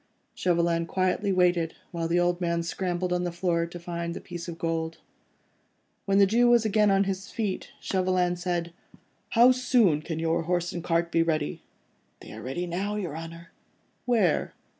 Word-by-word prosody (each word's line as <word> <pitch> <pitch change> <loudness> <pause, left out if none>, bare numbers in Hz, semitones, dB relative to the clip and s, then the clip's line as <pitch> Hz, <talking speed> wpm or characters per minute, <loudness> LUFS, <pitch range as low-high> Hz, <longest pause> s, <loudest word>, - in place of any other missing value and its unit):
Chauvelin 170 -1 +1
quietly 185 +3 0
waited 175 -3 +2 0.2
while 165 -1 -2
the 170 +1 +2
old 175 0 +1
man 170 -1 0
scrambled 180 +1 -2
on 180 0 0
the 175 - -2
floor, 170 -1 0
to 175 +1 -9
find 170 0 -4
the - - -5
piece 175 -1 -8
of 170 -1 -6
gold. 165 -1 -2 1.1
When 195 0 +2
the 200 - +7
Jew 235 +5 +3
was 240 -2 +4
again 210 0 +3
on 195 0 +4
his 195 0 -4
feet, 210 -4 -3
Chauvelin 185 -1 +1
said,— 175 -1 -3 0.6
"How 245 +2 +8
soon 245 - +3
can 160 0 -5
your 165 +1 0
horse 175 +1 -1
and 175 - -5
cart 170 0 0
be 165 - +3
ready?" 155 -3 -1 0.6
"They - - -11
are - - -8
ready 135 +8 -3
now, 190 +4 -2
your 180 -8 -4
Honour." 165 +1 -9 0.6
"Where?" 215 -9 +2
175 Hz, 175 wpm, -27 LUFS, 170-190 Hz, 1.1 s, How